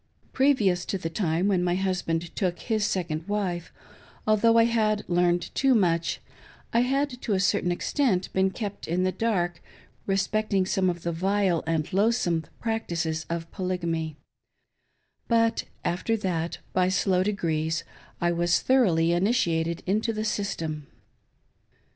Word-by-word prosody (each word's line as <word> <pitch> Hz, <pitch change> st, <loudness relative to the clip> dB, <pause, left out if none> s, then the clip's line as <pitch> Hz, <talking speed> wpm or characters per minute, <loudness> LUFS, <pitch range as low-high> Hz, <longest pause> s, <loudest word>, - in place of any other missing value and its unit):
Previous 220 Hz, -10 st, +3 dB
to 195 Hz, -, -2 dB
the 165 Hz, -3 st, -4 dB
time 170 Hz, 0 st, 0 dB
when 185 Hz, -3 st, +2 dB
my 175 Hz, 0 st, +1 dB
husband 180 Hz, -3 st, -2 dB
took 180 Hz, -3 st, 0 dB
his 220 Hz, -3 st, -1 dB
second 170 Hz, -2 st, -2 dB
wife, 190 Hz, -5 st, -2 dB, 0.5 s
although 220 Hz, +2 st, +4 dB
I 230 Hz, -, +7 dB
had 215 Hz, -2 st, +1 dB
learned 175 Hz, -1 st, +1 dB
too 270 Hz, -2 st, +3 dB
much, 170 Hz, -5 st, +1 dB, 0.5 s
I 230 Hz, -, +4 dB
had 260 Hz, +1 st, 0 dB
to 215 Hz, -, -1 dB
a 190 Hz, -, +2 dB
certain 180 Hz, -1 st, +1 dB
extent 190 Hz, -, 0 dB
been 190 Hz, 0 st, +3 dB
kept 205 Hz, 0 st, -6 dB
in 175 Hz, +3 st, 0 dB
the 185 Hz, -, +2 dB
dark 180 Hz, -6 st, -1 dB, 0.5 s
respecting 195 Hz, 0 st, +1 dB
some 185 Hz, 0 st, +1 dB
of 175 Hz, -1 st, -4 dB
the 170 Hz, -, -1 dB
vile 190 Hz, 0 st, +1 dB
and 160 Hz, -1 st, -1 dB
loath 215 Hz, +5 st, +3 dB
some 170 Hz, -8 st, 0 dB
practices 170 Hz, -8 st, -2 dB
of 165 Hz, 0 st, -4 dB
Polygamy; 170 Hz, -5 st, -2 dB, 1.1 s
but 230 Hz, -1 st, +2 dB, 0.2 s
after 205 Hz, +6 st, 0 dB
that, 170 Hz, -5 st, -2 dB, 0.2 s
by 185 Hz, 0 st, +3 dB
slow 185 Hz, -1 st, +2 dB
degrees, 160 Hz, -5 st, -1 dB, 0.4 s
I 175 Hz, 0 st, +2 dB
was 175 Hz, 0 st, +2 dB
thoroughly 180 Hz, -11 st, +3 dB
initiated 170 Hz, -4 st, +1 dB
into 215 Hz, +4 st, 0 dB
the 215 Hz, 0 st, -3 dB
system. 160 Hz, -8 st, -3 dB
185 Hz, 140 wpm, -26 LUFS, 170-215 Hz, 1.1 s, I